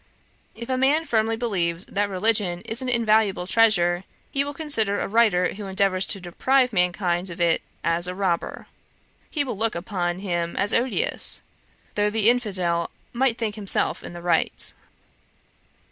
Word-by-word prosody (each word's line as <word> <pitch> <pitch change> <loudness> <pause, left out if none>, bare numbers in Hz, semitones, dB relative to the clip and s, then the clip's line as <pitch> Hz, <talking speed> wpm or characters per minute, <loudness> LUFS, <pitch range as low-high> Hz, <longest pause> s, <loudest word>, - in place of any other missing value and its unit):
If 235 +1 -8
a 255 -1 -1
man 295 +5 +2
firmly 225 -4 +1
believes 185 -7 -1
that 205 0 -1
religion 195 -2 0
is 225 +6 -2
an 255 - -3
invaluable 215 -5 +2
treasure, 180 -4 +3 0.3
he 275 - +1
will 285 - -5
consider 230 -10 +2
a - - -2
writer 205 -5 +2
who 205 0 -7
endeavours 190 -1 +1
to 200 - 0
deprive 250 +8 +1
mankind 180 0 0
of 170 +1 -9
it 170 -1 +2 0.2
as 170 +1 0
a 180 - -4
robber; 185 -3 -2 0.6
he 295 - -1
will 255 -5 -4
look 225 -1 -1
upon 175 -1 -2
him 175 -3 -3
as 200 +1 +1
odious, 265 - +1 0.5
though 210 0 +1
the 220 +1 +4
infidel 185 -8 -1 0.2
might 245 -1 +1
think 225 -3 -2
himself 205 -2 0
in - - -8
the 175 0 -9
right. 175 - 0
205 Hz, 160 wpm, -24 LUFS, 180-230 Hz, 0.6 s, the